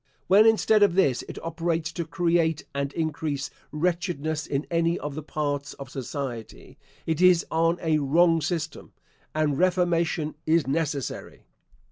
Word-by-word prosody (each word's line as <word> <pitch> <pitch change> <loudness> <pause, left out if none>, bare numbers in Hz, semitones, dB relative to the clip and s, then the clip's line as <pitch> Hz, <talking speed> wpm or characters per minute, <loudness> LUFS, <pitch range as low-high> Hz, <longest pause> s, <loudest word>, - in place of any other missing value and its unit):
When, 205 +4 +6
instead 220 -1 +4
of 200 -4 +4
this, 140 -10 +3
it - - -7
operates 165 -1 -2
to 170 +1 -4
create 165 -2 +1
and 140 0 -2
increase 155 -3 -2 0.2
wretchedness 160 -2 -1
in 140 +1 -2
any 170 0 +1
of 145 -1 -5
the 155 - -5
parts 145 -1 -3
of 135 -2 -10
society, 130 -4 -6 0.3
it 160 +1 -1
is 180 -2 +5
on 165 +1 +2
a 160 -2 +2
wrong 165 +4 +3
system, 160 0 -4 0.4
and 150 -3 +1
reformation 175 -3 +1
is 160 -1 +3
necessary. 145 -1 -3
160 Hz, 140 wpm, -26 LUFS, 145-170 Hz, 0.4 s, When